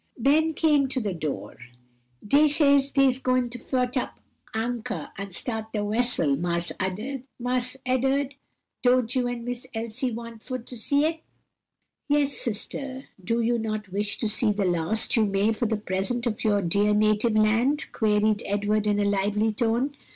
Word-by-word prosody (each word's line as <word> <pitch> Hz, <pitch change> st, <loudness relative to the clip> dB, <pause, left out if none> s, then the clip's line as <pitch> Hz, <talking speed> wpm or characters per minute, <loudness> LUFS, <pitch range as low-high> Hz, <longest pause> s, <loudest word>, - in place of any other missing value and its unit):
'" -, -, -31 dB
Ben 315 Hz, +2 st, +3 dB
came 295 Hz, -4 st, +3 dB
to 260 Hz, -, -2 dB
the 205 Hz, -5 st, -2 dB
door. 155 Hz, -4 st, -5 dB, 0.7 s
"Dey 290 Hz, +7 st, +5 dB
says 280 Hz, -2 st, +4 dB
dey's 270 Hz, -2 st, +3 dB
goin' 255 Hz, -2 st, +1 dB
to 245 Hz, -, -7 dB
fotch 250 Hz, +1 st, -1 dB
up 255 Hz, -, -2 dB, 0.3 s
de 220 Hz, -, -4 dB
anchor 225 Hz, -8 st, -4 dB
and 200 Hz, 0 st, -6 dB
start 220 Hz, +3 st, -3 dB
de 210 Hz, -2 st, -1 dB
wessel, 215 Hz, -, +2 dB
Marse 170 Hz, +1 st, 0 dB
Ed'ard. 255 Hz, +5 st, -2 dB, 0.5 s
Don't 250 Hz, -1 st, +2 dB
you 250 Hz, -1 st, +1 dB
and 240 Hz, -1 st, -4 dB
Miss 245 Hz, +1 st, -5 dB
Elsie 230 Hz, +3 st, -2 dB
want 230 Hz, -1 st, -8 dB
for 255 Hz, +1 st, -4 dB
to 245 Hz, +1 st, -10 dB
see 280 Hz, +6 st, +1 dB
it?" 320 Hz, +1 st, -1 dB, 0.9 s
"Yes, 290 Hz, -1 st, +2 dB
sister, 260 Hz, +4 st, -4 dB
do 230 Hz, +4 st, 0 dB
you 235 Hz, +1 st, +1 dB
not 215 Hz, -2 st, -4 dB
wish 205 Hz, +1 st, -1 dB
to 225 Hz, -, -1 dB
see 215 Hz, +1 st, +3 dB
the 205 Hz, -1 st, -1 dB
last 180 Hz, +8 st, +1 dB
you 225 Hz, -, +4 dB
may, 200 Hz, +3 st, +2 dB
for 235 Hz, +1 st, -1 dB
the 220 Hz, 0 st, 0 dB
present, 205 Hz, +5 st, -2 dB
of 220 Hz, -3 st, -2 dB
your 205 Hz, -2 st, +2 dB
dear 205 Hz, +4 st, +2 dB
native 215 Hz, +2 st, +2 dB
land?" 230 Hz, +7 st, +2 dB
queried 210 Hz, -1 st, +2 dB
Edward 205 Hz, +1 st, 0 dB
in 205 Hz, 0 st, +2 dB
a 205 Hz, -, +2 dB
lively 205 Hz, +2 st, +1 dB
tone. 240 Hz, +5 st, 0 dB
230 Hz, 170 wpm, -26 LUFS, 210-255 Hz, 0.9 s, Dey